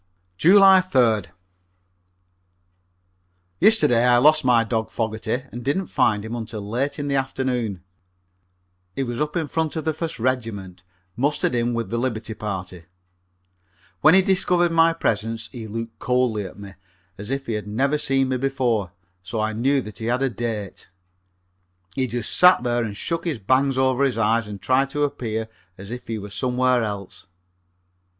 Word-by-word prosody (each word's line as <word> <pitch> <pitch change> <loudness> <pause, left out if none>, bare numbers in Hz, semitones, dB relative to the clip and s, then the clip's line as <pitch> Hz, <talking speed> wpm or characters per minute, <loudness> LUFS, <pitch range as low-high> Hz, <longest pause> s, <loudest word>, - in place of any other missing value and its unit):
July 190 - +7
3d. 120 - +2 2.3
Yesterday 125 - +5
I 125 0 +5
lost 155 +4 +5
my 120 -3 +4
dog 110 -1 -2
Fogerty 110 +2 -3
and 120 +1 -7
didn't 145 +9 0
find 105 0 +2
him 110 - -6
until 110 -3 -6
late 130 +7 -2
in 145 -1 -4
the 140 - -1
afternoon. 125 -7 -2 1.1
He 135 - -1
was 120 +1 -4
up 150 +2 -2
in 165 -3 -1
front 160 -1 -2
of 160 - -4
the 160 - +1
First 165 +1 -4
Regiment, 110 -7 -3 0.3
mustered 140 +2 0
in 120 0 0
with 115 -4 -3
the 115 - -1
liberty 115 -3 -3
party. 95 -5 -6 1.1
When 155 - +6
he 190 - +6
discovered 180 -2 +2
my 165 0 +4
presence 115 -7 -2
he 115 -3 -8
looked 115 +1 -6
coldly 125 -5 0
at 95 - -10
me, 100 -1 -10 0.5
as 105 - -6
if 135 0 -3
he 115 - -3
had 105 -1 -4
never 135 +8 0
seen 135 -2 +1
me 130 - 0
before, 120 -8 -1 0.3
so 105 +5 -5
I 110 0 -1
knew 135 +5 +1
that 105 -5 -10
he 110 - -5
had 125 +3 0
a 135 - 0
date. 110 -4 -5 1.0
He 130 +3 -1
just 120 -1 -2
sat 180 -7 +6
there 120 -1 0
and 105 -3 -5
shook 165 +6 -3
his 160 -6 -1
bangs 130 +6 +1
over 130 0 +2
his 135 -4 +1
eyes 115 0 +1
and 105 -1 -7
tried 130 +7 +1
to 145 +1 -1
appear 110 -6 -3 0.3
as 100 +2 -10
if 125 0 -7
he 115 - -3
were 100 -1 -8
somewhere 125 +4 +1
else. 100 -2 -6
120 Hz, 170 wpm, -22 LUFS, 110-135 Hz, 2.3 s, July